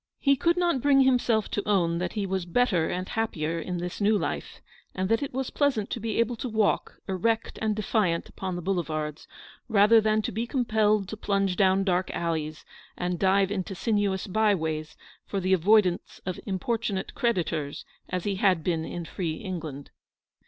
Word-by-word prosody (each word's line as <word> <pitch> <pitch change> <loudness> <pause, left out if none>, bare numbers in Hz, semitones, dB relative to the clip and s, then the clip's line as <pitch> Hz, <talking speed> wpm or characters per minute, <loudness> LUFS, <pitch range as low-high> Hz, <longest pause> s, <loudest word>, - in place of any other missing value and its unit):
He 275 -1 +3
could 340 +6 +2
not 345 -7 +1
bring 275 0 +5
himself 245 -5 +3
to 205 - -2
own 170 -4 +2
that 180 0 -2
he 210 -3 -1
was 190 -2 -2
better 180 -4 +2
and 185 +1 -3
happier 165 -8 -2
in 180 +2 -4
this 175 +3 -5
new 210 +1 +4
life, - - -4 0.4
and 185 0 -1
that 225 - +2
it 280 - -3
was 265 0 -3
pleasant 265 -8 0
to - - -2
be 225 -1 -3
able 235 +1 +1
to 250 - -4
walk 215 -2 +1
erect 220 +4 -1
and 215 -1 +1
defiant 205 -5 0
upon 185 -2 -5
the 175 - -5
Boulevards, 155 -5 -2 0.4
rather 220 +1 +6
than 215 0 +2
to - - -2
be 230 +4 -2
compelled 215 -6 +2
to - - -4
plunge 195 -3 0
down 190 +1 +3
dark 185 -1 +1
alleys, 155 -2 -3 0.3
and 180 -1 -2
dive 195 0 +3
into 195 -1 -3
sinuous 205 -3 0
byways, 175 -7 0 0.3
for 200 - -2
the 185 0 +1
avoidance 190 0 +3
of 185 -1 -3
importunate 200 +1 -2
creditors, 165 - -1 0.2
as 180 -1 -2
he 200 -2 -1
had 185 -5 +3
been 165 -2 0
in 170 +1 -5
free 165 -1 -3
England. 160 -7 -6
195 Hz, 180 wpm, -27 LUFS, 175-220 Hz, 0.4 s, rather